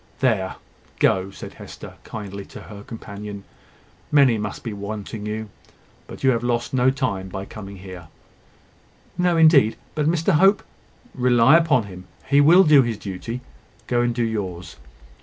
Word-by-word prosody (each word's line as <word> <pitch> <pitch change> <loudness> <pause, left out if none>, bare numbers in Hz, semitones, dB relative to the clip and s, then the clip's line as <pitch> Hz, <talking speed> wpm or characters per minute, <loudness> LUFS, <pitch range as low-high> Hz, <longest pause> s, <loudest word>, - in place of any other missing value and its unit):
"There, 110 -8 +1 0.4
go," 95 0 +2
said 100 - -10
Hester, - - -11
kindly, 100 -2 -7
to - - -11
her 105 -1 -11
companion. 105 -2 -8 0.7
"Many 135 -6 +5
must 105 0 -5
be 115 -4 -4
wanting 105 +1 -6
you: 110 0 -4 0.6
but - - -11
you 135 - +5
have 115 -2 0
lost 120 0 -1
no 130 0 +3
time 115 -8 -2
by 95 +1 -6
coming 100 -2 -9
here." 90 -3 -10 1.1
"No, 180 -1 +1
indeed. 155 -9 +5 0.2
But 150 -1 0
Mr 165 +3 +2
Hope 195 +6 +4 0.3
" - - -33
"Rely 125 +2 +4
upon 160 -8 +3
him. 90 -2 -11 0.2
He 140 +1 +4
will 170 +6 +7
do 150 -4 +6
his 120 -4 -2
duty. 100 +6 -6 0.4
Go 120 -1 +1
and 120 -1 0
do 120 - 0
yours." 95 -7 -4
115 Hz, 160 wpm, -22 LUFS, 100-135 Hz, 1.1 s, will